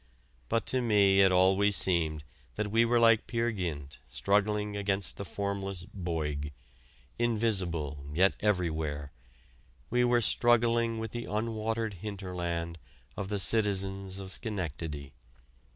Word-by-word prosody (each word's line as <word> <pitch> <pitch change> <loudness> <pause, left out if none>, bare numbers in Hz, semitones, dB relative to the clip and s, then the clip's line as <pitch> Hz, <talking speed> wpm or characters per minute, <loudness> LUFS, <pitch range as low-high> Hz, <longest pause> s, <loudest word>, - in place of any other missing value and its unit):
But 115 - 0
to 130 - +1
me 100 -4 +4
it 95 -1 +5
always 95 +2 +4
seemed 80 -5 +2 0.3
that 105 -1 -2
we 115 +2 +4
were 120 +1 +3
like 115 -1 +4
Peer 115 0 0
Gynt 80 -9 -5
struggling 105 +1 +1
against 100 -4 0
the 100 - -5
formless 100 -2 -4
Boyg 75 -6 -3 0.7
invisible 95 -11 0
yet 95 +6 +3
everywhere 80 -8 -1 0.8
we 125 +1 +3
were 120 0 +3
struggling 115 0 +2
with 110 -1 -4
the 120 0 -5
unwatered 110 -1 -2
hinterland 90 -5 -4 0.4
of 100 -1 -5
the 105 - -1
citizens 95 -2 0
of 95 -1 -6
Schenectady. 80 - -4
100 Hz, 120 wpm, -30 LUFS, 85-110 Hz, 0.8 s, it